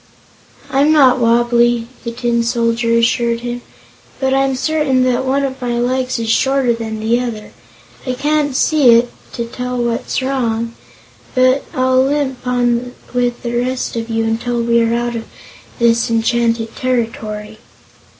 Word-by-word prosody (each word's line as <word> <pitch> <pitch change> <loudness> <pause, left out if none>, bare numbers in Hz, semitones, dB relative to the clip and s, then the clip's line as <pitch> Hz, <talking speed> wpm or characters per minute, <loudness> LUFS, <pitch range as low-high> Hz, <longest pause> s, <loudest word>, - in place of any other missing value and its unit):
"I'm 280 +3 +3
not 265 -5 +5
wobbly," 240 0 +2 0.2
the 235 - -4
Tin 235 0 0
Soldier 230 0 +1
assured 235 0 +1
him, 240 0 -4 0.6
"but 265 -1 +1
I'm 270 0 +2
certain 280 -2 +1
that 255 +1 +1
one 275 +2 +1
of 265 -1 -4
my 240 -1 -1
legs 255 +1 0
is 230 -1 -3
shorter 265 +2 +2
than 220 -1 -5
the 225 +2 +1
other. 230 -4 -5 0.6
I 255 - 0
can't 290 0 0
see 270 -5 +5
it, 240 +1 +2 0.2
to 235 - -3
tell 250 +1 -5
what's 235 -1 -1
gone 260 - -2
wrong, 230 -3 -1 0.6
but 255 +1 +3
I'll 255 0 +3
limp 265 -2 -1
on 245 0 0 0.2
with 245 -1 -1
the 235 -1 -3
rest 250 +1 -2
of 230 0 -4
you 225 0 0
until 235 +2 -1
we 235 0 +3
are 230 0 +1
out 240 0 -2
of 225 -1 -5 0.5
this 235 -1 +2
enchanted 230 0 0
territory." 220 -4 -3
240 Hz, 155 wpm, -17 LUFS, 230-255 Hz, 0.6 s, not